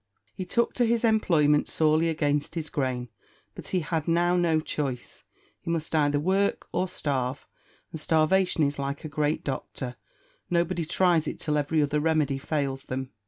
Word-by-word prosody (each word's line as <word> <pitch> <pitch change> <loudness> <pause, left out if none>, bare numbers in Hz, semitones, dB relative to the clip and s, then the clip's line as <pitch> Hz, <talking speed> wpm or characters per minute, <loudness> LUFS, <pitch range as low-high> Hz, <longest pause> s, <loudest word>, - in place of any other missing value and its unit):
He 185 - -5
took 235 +6 +1
to 245 - +2
his 235 0 +1
employment 165 -10 +3
sorely 155 +1 +2
against 150 -2 -1
his 160 -2 -4
grain; 125 -3 -2 0.4
but - - -9
he 185 - 0
had 160 0 -2
now 175 +1 +3
no 170 -3 +2
choice. 140 -5 -4 0.3
He - - -7
must 165 -1 -2
either 145 -2 +2
work 190 +5 +1
or 185 - 0
starve, 135 -6 -2 0.5
and 160 -3 -7
starvation 160 +2 +2
is 140 0 0
like 140 +2 -4
a - - -2
great 150 0 -1
doctor 130 -2 -5 0.5
nobody 170 -1 0
tries 170 -1 +2
it - - -4
till 150 - -1
every 150 +1 +1
other 145 +1 0
remedy 150 -3 +1
fails 140 -2 -2
them. 130 0 -4
155 Hz, 165 wpm, -27 LUFS, 145-170 Hz, 0.5 s, employment